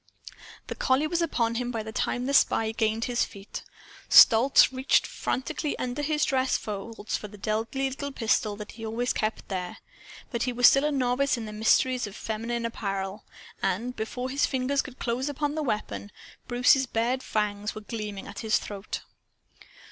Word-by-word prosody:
The - - -5
collie 265 +3 +2
was 340 +2 0
upon 235 -8 0
him 245 - -3
by 225 -3 -3
the 220 - -7
time 245 +2 -1
the 280 - -1
spy 225 -5 +3
gained 220 0 0
his 245 -1 +1
feet. 200 0 -7 0.5
Stolz 240 +5 +7
reached 260 +1 +2
frantically 265 +4 -3
under 250 +3 -3
his 300 0 +1
dress 260 -1 +1
folds 210 +1 -5
for 210 - -4
the 210 0 -13
deadly 225 +6 -1
little 280 +2 -5
pistol 220 -4 0
that 210 0 -8
he 225 - -11
always 230 +3 -1
kept 215 0 -2
there. 180 -2 -4 0.5
But 235 -3 -2
he 250 0 0
was 245 0 +7
still 275 +2 +5
a 300 - +1
novice 260 0 +1
in 230 - -5
the 215 - -7
mysteries 245 +3 +2
of 205 - -10
feminine 230 +2 -3
apparel. 195 -2 -4 0.4
And, 220 +7 -1
before 250 +4 -4
his 280 +2 +2
fingers 270 +1 0
could 260 -1 -11
close 250 +4 -2
on 290 0 -2
the 310 - -2
weapon, 210 -5 -3 0.4
Bruce's 250 +2 +4
bared 240 +3 0
fangs 210 -2 -2
were 215 - -6
gleaming 210 -2 -6
at 200 - -8
his 220 -2 +2
throat. 205 0 -6
235 Hz, 180 wpm, -27 LUFS, 215-260 Hz, 0.5 s, Stolz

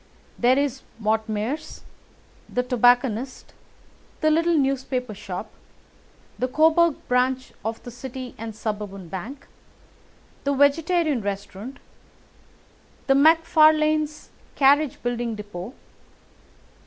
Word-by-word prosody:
There 250 +2 +4
is 275 -2 -1 0.2
Mortimer's, 220 +5 -2 0.7
the 250 - -1
tobacconist, 245 0 +1 0.7
the 310 -1 +3
little 330 +1 +3
newspaper 265 -4 -1
shop, 195 +1 -7 0.9
the 255 - +1
Coburg 320 +3 +4
branch 255 +1 0
of 225 +1 -4
the 245 - -8
City 255 +1 -8
and 225 -1 -7
Suburban 205 -4 -5
Bank, 220 - -7 1.0
the 280 0 0
Vegetarian 300 0 +2
Restaurant, 200 +5 -6 1.3
and 270 0 +4
McFarlane's 310 -1 +3 0.2
carriage 285 +1 +3
building 240 -1 -2
depot. 205 +2 -8
255 Hz, 95 wpm, -24 LUFS, 220-295 Hz, 1.3 s, There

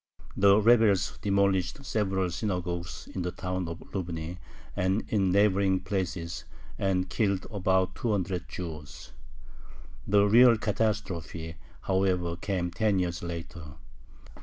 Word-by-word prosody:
The 100 +1 +5
rebels 110 -4 +4
demolished 100 - +1
several 95 -6 0
synagogues 90 -3 -3
in 95 - -3
the 90 - -1
town 90 0 -3
of 85 +1 -6
Lubny 85 -2 -4 0.4
and 95 +3 +1
in 95 -4 +2
neighboring 100 -1 +3
places, 90 -4 -3 0.4
and 95 -1 +1
killed 100 -2 0
about 95 -2 +1
two 120 -3 -2
hundred 90 -4 -2
Jews. 75 -5 -8 1.0
The 100 0 +4
real 120 +2 +7
catastrophe, 100 -7 -2 0.2
however, 95 -3 0
came 90 -1 -2
ten 100 +3 +1
years 85 -2 -1
later. 85 -2 -7
95 Hz, 115 wpm, -28 LUFS, 85-100 Hz, 1.0 s, real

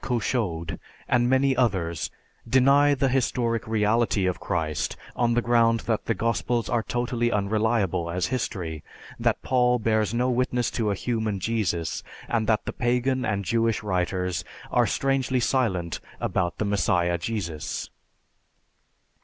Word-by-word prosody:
Couchoud, 100 - -1 0.3
and 120 0 +2
many 130 +1 +3
others 95 - 0 0.4
deny 140 +3 +5
the 135 0 +1
historic 120 -2 0
reality 110 -1 +2
of 90 -1 -1
Christ 80 -3 -2 0.2
on 120 -1 +2
the 120 - +2
ground 115 -1 +3
that 110 -2 -1
the 115 - 0
Gospels 115 +2 0
are 120 -1 +1
totally 120 0 -1
unreliable 105 -4 +1
as 90 +2 -1
history, 90 - -3 0.4
that - - 0
Paul 125 -1 +3
bears 110 -3 +1
no 120 +2 +1
witness 125 -1 0
to 110 -3 -1
a 100 - 0
human 110 -2 -2
Jesus, 95 -6 -1 0.3
and 110 -2 0
that 110 -2 +2
the - - -4
pagan 125 +2 0
and 100 -2 -1
Jewish 115 0 +1
writers 90 -2 -1 0.3
are - - +3
strangely 135 -1 +1
silent 105 -10 0 0.2
about 85 -1 -1
the 110 - -1
Messiah 90 -3 +1
Jesus. 85 -7 -4
115 Hz, 135 wpm, -25 LUFS, 95-120 Hz, 0.4 s, deny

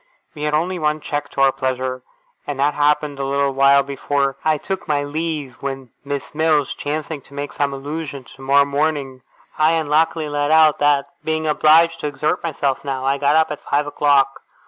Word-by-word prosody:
We 150 -1 -5
had 150 0 +1
only 175 +4 -1
one 150 0 0
check 145 -1 -4
to 135 - -3
our 135 0 +5
pleasure, 130 -1 -3 0.5
and 145 -2 -4
that 145 +2 +2
happened 150 -1 +1
a - - -1
little 140 0 0
while 140 +1 +4
before 140 0 -1
I 155 -1 +2
took 190 +5 -5
my 145 -2 +1
leave, 150 -3 -4
when, 135 -3 -5
Miss 140 0 -5
Mills 155 -2 +1
chancing 150 0 -4
to 140 - -17
make 145 0 -5
some 140 -1 0
allusion 140 0 -6
to - - -16
tomorrow 140 +1 +3
morning, 140 -2 -2 0.4
I 155 +1 +4
unluckily 160 0 +1
let 145 0 -1
out 155 -1 +5
that, 145 -1 +3 0.2
being 160 0 -1
obliged 160 +2 +4
to 150 - -3
exert 150 +4 -1
myself 140 -5 -2
now, 135 -2 -3
I 135 +1 +1
got 145 +1 +2
up 160 -1 +3
at 150 - -6
five 145 +1 0
o'clock. 140 -2 +2
145 Hz, 190 wpm, -20 LUFS, 140-155 Hz, 0.5 s, our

